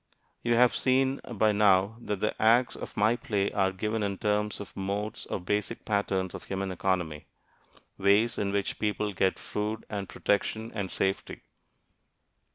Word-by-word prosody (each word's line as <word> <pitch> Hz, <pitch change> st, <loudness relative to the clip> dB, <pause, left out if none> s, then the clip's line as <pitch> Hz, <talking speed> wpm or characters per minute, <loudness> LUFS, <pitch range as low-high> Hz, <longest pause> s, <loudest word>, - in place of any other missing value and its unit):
You 120 Hz, 0 st, +2 dB
have 125 Hz, +1 st, +5 dB
seen 130 Hz, +1 st, +2 dB
by 110 Hz, 0 st, +3 dB
now 100 Hz, 0 st, +4 dB
that 105 Hz, -4 st, -4 dB
the 105 Hz, -, +1 dB
acts 120 Hz, +3 st, +4 dB
of -, -, -8 dB
my 110 Hz, +3 st, +4 dB
play 100 Hz, -4 st, -1 dB
are 95 Hz, -1 st, +2 dB
given 105 Hz, +3 st, -2 dB
in 100 Hz, -1 st, -1 dB
terms 105 Hz, +1 st, 0 dB
of 105 Hz, -, -9 dB
modes 100 Hz, +3 st, -3 dB
or -, -, -2 dB
basic 105 Hz, +5 st, -2 dB
patterns 95 Hz, -3 st, 0 dB
of -, -, -8 dB
human 95 Hz, 0 st, -3 dB
economy 90 Hz, -5 st, -1 dB, 0.7 s
ways 105 Hz, +4 st, +3 dB
in 100 Hz, -1 st, 0 dB
which 100 Hz, 0 st, -1 dB
people 105 Hz, -1 st, -1 dB
get 95 Hz, 0 st, +1 dB
food 105 Hz, +1 st, -4 dB
and 100 Hz, -2 st, -4 dB
protection 110 Hz, +2 st, -1 dB
and 100 Hz, -4 st, -3 dB
safety. 95 Hz, +1 st, -2 dB
105 Hz, 160 wpm, -29 LUFS, 95-110 Hz, 0.7 s, have